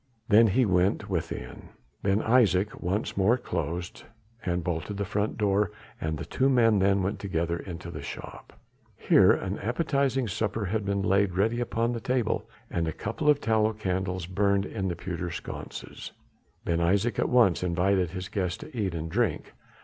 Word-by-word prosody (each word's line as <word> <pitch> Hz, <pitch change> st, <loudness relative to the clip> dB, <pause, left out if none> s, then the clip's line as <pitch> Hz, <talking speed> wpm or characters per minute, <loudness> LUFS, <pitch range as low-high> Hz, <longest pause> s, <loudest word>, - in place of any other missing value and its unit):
Then 110 Hz, +2 st, +7 dB
he 125 Hz, +5 st, +3 dB
went 90 Hz, -1 st, +1 dB
within. 60 Hz, +1 st, -4 dB, 0.3 s
Ben 100 Hz, +2 st, +1 dB
Isaje 105 Hz, -5 st, +3 dB
once 95 Hz, +4 st, -1 dB
more 100 Hz, +6 st, +3 dB
closed 85 Hz, -, -4 dB, 0.4 s
and 90 Hz, -2 st, -1 dB
bolted 85 Hz, +4 st, -3 dB
the 100 Hz, -, -1 dB
front 100 Hz, +2 st, -1 dB
door 105 Hz, -1 st, +2 dB, 0.3 s
and 80 Hz, 0 st, -2 dB
the -, -, -6 dB
two 135 Hz, +1 st, +1 dB
men 115 Hz, -5 st, +4 dB
then 100 Hz, 0 st, +3 dB
went 95 Hz, -, -2 dB
together 85 Hz, -3 st, -1 dB
into 85 Hz, -1 st, -7 dB
the -, -, -7 dB
shop. -, -, -8 dB, 0.5 s
Here -, -, +5 dB
an 95 Hz, +2 st, -1 dB
appetizing 135 Hz, -, 0 dB
supper 105 Hz, +1 st, -2 dB
had 105 Hz, +2 st, -1 dB
been 100 Hz, -1 st, 0 dB
laid 100 Hz, -1 st, +2 dB
ready 115 Hz, +5 st, +2 dB
upon 120 Hz, -1 st, 0 dB
the 120 Hz, -, -3 dB
table 125 Hz, -2 st, -1 dB, 0.2 s
and 85 Hz, -1 st, -1 dB
a -, -, 0 dB
couple 115 Hz, -, -2 dB
of 145 Hz, -1 st, +5 dB
tallow 110 Hz, -1 st, +2 dB
candles 95 Hz, -3 st, -2 dB
burned 100 Hz, +2 st, +1 dB
in 95 Hz, -3 st, -3 dB
pewter 85 Hz, 0 st, -4 dB
sconces. -, -, -7 dB, 0.5 s
Ben 85 Hz, 0 st, +1 dB
Isaje 100 Hz, +6 st, +1 dB
at -, -, +1 dB
once 120 Hz, -8 st, +4 dB
invited 90 Hz, +1 st, +1 dB
his 95 Hz, +2 st, -5 dB
guest 90 Hz, -5 st, -2 dB
to 150 Hz, -, -10 dB
eat 100 Hz, -6 st, -1 dB
and 80 Hz, 0 st, -3 dB
drink. 110 Hz, +6 st, -1 dB
100 Hz, 170 wpm, -27 LUFS, 90-110 Hz, 0.5 s, Then